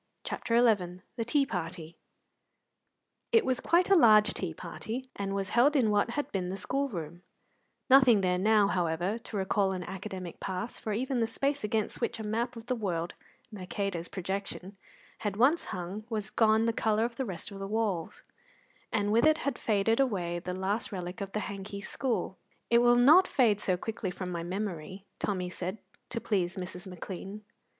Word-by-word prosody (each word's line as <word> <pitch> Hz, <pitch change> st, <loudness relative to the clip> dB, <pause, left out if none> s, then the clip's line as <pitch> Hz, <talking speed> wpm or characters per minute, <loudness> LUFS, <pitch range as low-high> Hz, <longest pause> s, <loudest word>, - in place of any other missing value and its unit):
CHAPTER 230 Hz, -, -1 dB
XI 190 Hz, -7 st, +2 dB
THE 235 Hz, -, -1 dB
TEA 275 Hz, +4 st, +2 dB
PARTY 170 Hz, -6 st, -5 dB, 1.4 s
It 455 Hz, -, +5 dB
was 255 Hz, -1 st, +1 dB
quite 350 Hz, +2 st, +3 dB
a -, -, +8 dB
large 215 Hz, -, +6 dB
tea 180 Hz, -4 st, -3 dB
party, 225 Hz, +10 st, -6 dB
and 195 Hz, 0 st, -3 dB
was 195 Hz, -1 st, -2 dB
held 270 Hz, +6 st, +4 dB
in 235 Hz, -6 st, +3 dB
what 205 Hz, +2 st, +2 dB
had 290 Hz, -, -2 dB
been 185 Hz, -2 st, -2 dB
the 190 Hz, -, -4 dB
school 275 Hz, +7 st, -1 dB
room; 170 Hz, -, -6 dB, 0.7 s
nothing 255 Hz, -5 st, +7 dB
there 180 Hz, -1 st, +1 dB
now, 210 Hz, +1 st, +4 dB
however, 180 Hz, +3 st, 0 dB
to 220 Hz, -, -6 dB
recall 190 Hz, 0 st, +1 dB
an 185 Hz, -1 st, -4 dB
academic 190 Hz, -2 st, -7 dB
past, 190 Hz, +5 st, -4 dB
for 215 Hz, -, -3 dB
even 255 Hz, +3 st, -1 dB
the 225 Hz, -, +2 dB
space 275 Hz, +4 st, -1 dB
against 215 Hz, +2 st, -1 dB
which 235 Hz, -, -1 dB
a -, -, -4 dB
map 230 Hz, +4 st, -2 dB
of 230 Hz, -1 st, -9 dB
the 255 Hz, -, 0 dB
world 175 Hz, -6 st, -2 dB, 0.4 s
(Mercator's 195 Hz, -3 st, -3 dB
projection) 195 Hz, +1 st, -5 dB, 0.4 s
had 205 Hz, -2 st, -3 dB
once 275 Hz, +9 st, +4 dB
hung 185 Hz, +4 st, -5 dB
was 215 Hz, -3 st, -3 dB
gone 220 Hz, 0 st, +4 dB
the 230 Hz, -, +1 dB
colour 220 Hz, 0 st, +1 dB
of 235 Hz, 0 st, -5 dB
the 265 Hz, -, -1 dB
rest 185 Hz, -2 st, -5 dB
of 195 Hz, -, -8 dB
the 195 Hz, -, -4 dB
walls, 205 Hz, -6 st, -2 dB, 0.7 s
and 205 Hz, -1 st, +1 dB
with 230 Hz, +6 st, +5 dB
it 310 Hz, 0 st, +5 dB
had 280 Hz, -, -3 dB
faded 220 Hz, +2 st, +2 dB
away 180 Hz, -10 st, 0 dB
the 180 Hz, +1 st, -5 dB
last 205 Hz, +7 st, -2 dB
relic 180 Hz, +1 st, -5 dB
of 195 Hz, -1 st, -4 dB
the 215 Hz, -, -1 dB
Hanky 200 Hz, 0 st, -6 dB
School. 245 Hz, +4 st, -2 dB, 0.3 s
"It 235 Hz, -, +7 dB
will 240 Hz, 0 st, +5 dB
not 300 Hz, +10 st, +7 dB
fade 215 Hz, -6 st, +3 dB
so 185 Hz, -3 st, +1 dB
quickly 215 Hz, 0 st, -4 dB
from 180 Hz, 0 st, -5 dB
my 170 Hz, -1 st, -3 dB
memory," 185 Hz, 0 st, -5 dB
Tommy 180 Hz, -3 st, -2 dB
said, 185 Hz, +3 st, -4 dB, 0.3 s
to 230 Hz, -, -3 dB
please 190 Hz, -5 st, 0 dB
Mrs. 180 Hz, 0 st, -6 dB
McLean. 190 Hz, +3 st, -7 dB
205 Hz, 185 wpm, -30 LUFS, 185-230 Hz, 1.4 s, a